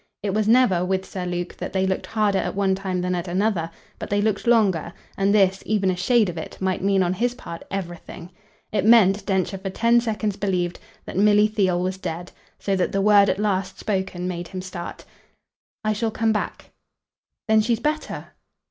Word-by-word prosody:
It 200 Hz, -2 st, -1 dB
was 215 Hz, 0 st, +1 dB
never, 225 Hz, -7 st, +4 dB
with 190 Hz, +1 st, -1 dB
Sir 180 Hz, -2 st, -5 dB
Luke, 175 Hz, 0 st, -4 dB
that -, -, -6 dB
they 190 Hz, -1 st, +1 dB
looked 190 Hz, 0 st, -2 dB
harder 210 Hz, -3 st, +1 dB
at -, -, -3 dB
one 195 Hz, -1 st, +2 dB
time 190 Hz, -1 st, -2 dB
than 180 Hz, 0 st, -1 dB
at 175 Hz, 0 st, -3 dB
another; 180 Hz, -2 st, 0 dB, 0.3 s
but -, -, -6 dB
they 205 Hz, -, +1 dB
looked 210 Hz, +1 st, 0 dB
longer, 200 Hz, -9 st, +3 dB, 0.2 s
and 195 Hz, 0 st, +2 dB
this, 195 Hz, -2 st, +3 dB
even 200 Hz, -3 st, +1 dB
a -, -, -2 dB
shade 215 Hz, +5 st, +3 dB
of 170 Hz, -2 st, -4 dB
it, -, -, -8 dB
might 190 Hz, -1 st, -1 dB
mean 195 Hz, -1 st, +3 dB
on 175 Hz, 0 st, 0 dB
his 240 Hz, +5 st, -1 dB
part 170 Hz, -8 st, -8 dB
everything. 175 Hz, -2 st, -6 dB, 0.4 s
It 205 Hz, -3 st, 0 dB
meant, 210 Hz, -3 st, +5 dB
Densher 190 Hz, 0 st, 0 dB
for 195 Hz, 0 st, -4 dB
ten 235 Hz, +4 st, +3 dB
seconds 215 Hz, -3 st, -2 dB
believed, 180 Hz, -3 st, -1 dB, 0.3 s
that -, -, -6 dB
Milly 210 Hz, +1 st, +5 dB
Theale 190 Hz, -5 st, +1 dB
was 185 Hz, +1 st, -2 dB
dead; 175 Hz, 0 st, -5 dB, 0.3 s
so 195 Hz, -, -1 dB
that 185 Hz, -, 0 dB
the 195 Hz, -, +1 dB
word 200 Hz, -1 st, +6 dB
at 185 Hz, -, +1 dB
last 195 Hz, -2 st, -1 dB
spoken 190 Hz, -3 st, -2 dB
made 175 Hz, -1 st, -4 dB
him 185 Hz, 0 st, -6 dB
start. 180 Hz, -2 st, -7 dB, 0.8 s
"I 215 Hz, 0 st, +1 dB
shall 225 Hz, +2 st, -1 dB
come 220 Hz, 0 st, +1 dB
back." 210 Hz, -, -4 dB, 0.8 s
"Then 220 Hz, 0 st, +5 dB
she's 225 Hz, +1 st, 0 dB
better?" 305 Hz, +4 st, -3 dB
195 Hz, 200 wpm, -23 LUFS, 185-215 Hz, 0.8 s, word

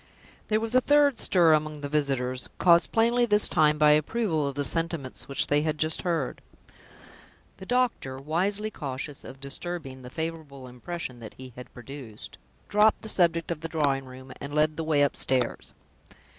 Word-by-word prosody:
There 215 Hz, 0 st, +2 dB
was 225 Hz, +1 st, -3 dB
a 255 Hz, -, +5 dB
third 285 Hz, -2 st, +3 dB
stir 170 Hz, -4 st, +4 dB
among 155 Hz, -1 st, -1 dB
the 145 Hz, -, -3 dB
visitors 135 Hz, -4 st, -1 dB
caused 170 Hz, -1 st, +4 dB
plainly 235 Hz, +2 st, +3 dB
this 210 Hz, -1 st, +5 dB
time 150 Hz, -1 st, +3 dB
by 150 Hz, 0 st, +5 dB
approval 155 Hz, 0 st, +1 dB
of 140 Hz, -, -4 dB
the 145 Hz, -, -1 dB
sentiments 165 Hz, -4 st, -2 dB
which 140 Hz, -, +1 dB
they 145 Hz, 0 st, +2 dB
had 155 Hz, 0 st, -1 dB
just 155 Hz, +1 st, 0 dB
heard. 165 Hz, -7 st, -2 dB, 1.2 s
The 190 Hz, -, -11 dB
doctor, 245 Hz, -, 0 dB
wisely 190 Hz, +9 st, -1 dB
cautious 140 Hz, -3 st, -6 dB
of 135 Hz, 0 st, -11 dB
disturbing 140 Hz, -1 st, -6 dB
the 125 Hz, -, -10 dB
favorable 160 Hz, -3 st, -6 dB
impression 125 Hz, +1 st, -6 dB
that 110 Hz, -2 st, -10 dB
he 130 Hz, -1 st, -11 dB
had 125 Hz, -, -11 dB
produced, 125 Hz, -4 st, -10 dB, 0.3 s
dropped 210 Hz, +2 st, +3 dB
the 220 Hz, -, -5 dB
subject 170 Hz, -4 st, +2 dB
of 160 Hz, -2 st, -4 dB
the 165 Hz, -, -5 dB
drawing 140 Hz, -4 st, 0 dB
room, 130 Hz, 0 st, -12 dB
and 140 Hz, +1 st, -6 dB
led 155 Hz, 0 st, +2 dB
the 165 Hz, -, -3 dB
way 155 Hz, -2 st, +2 dB
upstairs. 130 Hz, -3 st, -1 dB
150 Hz, 170 wpm, -27 LUFS, 135-175 Hz, 1.2 s, a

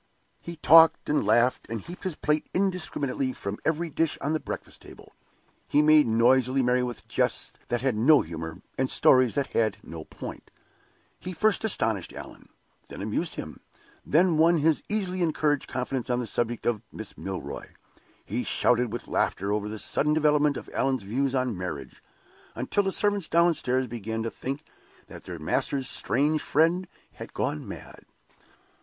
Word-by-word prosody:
He 170 Hz, -, -7 dB
talked 165 Hz, +1 st, +6 dB
and 150 Hz, -, +2 dB
laughed, 120 Hz, +4 st, +2 dB
and 115 Hz, 0 st, -3 dB
heaped 175 Hz, -, -10 dB
his 185 Hz, -4 st, -2 dB
plate 150 Hz, 0 st, -1 dB
indiscriminately 155 Hz, -9 st, -1 dB
from 100 Hz, -2 st, -5 dB
every 165 Hz, +2 st, 0 dB
dish 165 Hz, +1 st, 0 dB
on 145 Hz, +3 st, -1 dB
the 155 Hz, -, 0 dB
breakfast -, -, -7 dB
table. -, -, -14 dB, 0.5 s
He 150 Hz, -, +3 dB
made 155 Hz, -2 st, +6 dB
noisily 130 Hz, +3 st, +3 dB
merry 125 Hz, +1 st, +2 dB
with 125 Hz, -2 st, -5 dB
jests -, -, -1 dB
that 120 Hz, -, -1 dB
had 130 Hz, -4 st, +1 dB
no 140 Hz, +7 st, +5 dB
humor, 80 Hz, 0 st, -7 dB, 0.2 s
and 130 Hz, 0 st, +1 dB
stories 130 Hz, -2 st, +4 dB
that 140 Hz, -1 st, -1 dB
had 110 Hz, -3 st, +1 dB
no 80 Hz, -1 st, -8 dB
point. -, -, -9 dB, 0.7 s
He 185 Hz, -, -6 dB
first 215 Hz, +6 st, +1 dB
astonished 110 Hz, -, 0 dB
Allan, -, -, -11 dB, 0.4 s
then -, -, -7 dB
amused -, -, -2 dB
him, -, -, -7 dB, 0.4 s
then 165 Hz, +1 st, +3 dB
won 170 Hz, +2 st, +5 dB
his 155 Hz, 0 st, +2 dB
easily 190 Hz, -4 st, -1 dB
encouraged 150 Hz, -3 st, +1 dB
confidence 125 Hz, -1 st, -3 dB
on 125 Hz, 0 st, +1 dB
the 125 Hz, -, -2 dB
subject 120 Hz, +2 st, -2 dB
of 115 Hz, -3 st, 0 dB
Miss 110 Hz, -2 st, -8 dB
Milroy. 90 Hz, -8 st, -6 dB, 0.6 s
He 120 Hz, +4 st, -2 dB
shouted 125 Hz, -2 st, +1 dB
with 120 Hz, -, -6 dB
laughter 100 Hz, +2 st, 0 dB
over 105 Hz, 0 st, -1 dB
the 110 Hz, -, -5 dB
sudden 150 Hz, +7 st, 0 dB
development 150 Hz, -2 st, +3 dB
of -, -, -8 dB
Allan's 130 Hz, -5 st, 0 dB
views 130 Hz, +7 st, -1 dB
on 125 Hz, -4 st, 0 dB
marriage, 90 Hz, -6 st, -6 dB, 0.5 s
until 205 Hz, -, 0 dB
the 195 Hz, -1 st, -1 dB
servants 205 Hz, -4 st, +1 dB
downstairs 160 Hz, -7 st, +2 dB
began 115 Hz, -1 st, -4 dB
to 115 Hz, -, -3 dB
think 140 Hz, +3 st, -5 dB, 0.4 s
that -, -, -12 dB
their -, -, -6 dB
master's 135 Hz, -2 st, -1 dB
strange 150 Hz, +4 st, +1 dB
friend 170 Hz, +5 st, +2 dB, 0.2 s
had -, -, -11 dB
gone 75 Hz, -, -2 dB
mad. -, -, -10 dB
130 Hz, 165 wpm, -27 LUFS, 115-155 Hz, 0.7 s, talked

